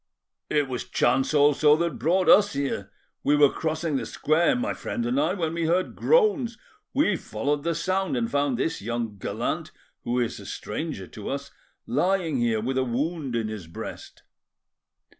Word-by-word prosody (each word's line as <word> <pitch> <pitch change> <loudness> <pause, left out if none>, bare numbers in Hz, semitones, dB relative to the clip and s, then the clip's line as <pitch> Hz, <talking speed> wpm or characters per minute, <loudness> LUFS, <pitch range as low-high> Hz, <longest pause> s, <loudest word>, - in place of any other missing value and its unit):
"It 150 -2 +2
was 125 -2 -4
chance 130 +2 +2
also 150 0 +5
that 165 -6 -2
brought 175 +8 +2
us 205 0 +6
here. 135 -8 -2 0.3
We 145 - +4
were 145 -1 +6
crossing 160 -2 -1
the 115 -3 -4
square, 160 - +2
my 250 +4 -1
friend 120 - -4
and 125 +3 +1
I, 160 +6 +1
when 165 -4 -2
we 165 -1 -1
heard 180 +3 +1
groans. 390 - +2 0.3
We 265 -8 +2
followed 140 +2 -2
the 170 +2 -1
sound, 185 -2 0
and 115 -1 0
found 140 -2 0
this 165 +6 -1
young 115 -1 -3
gallant, - - -3 0.3
who 120 +1 0
is 120 -2 -1
a - - -10
stranger 105 - -5
to 105 +2 -8
us, 140 0 -4 0.3
lying 180 -6 +1
here, 115 -3 +1
with 130 +3 -1
a - - +2
wound 135 +2 -2
in 115 -2 0
his 105 -6 -6
breast." 80 - -9
145 Hz, 175 wpm, -26 LUFS, 120-170 Hz, 0.3 s, us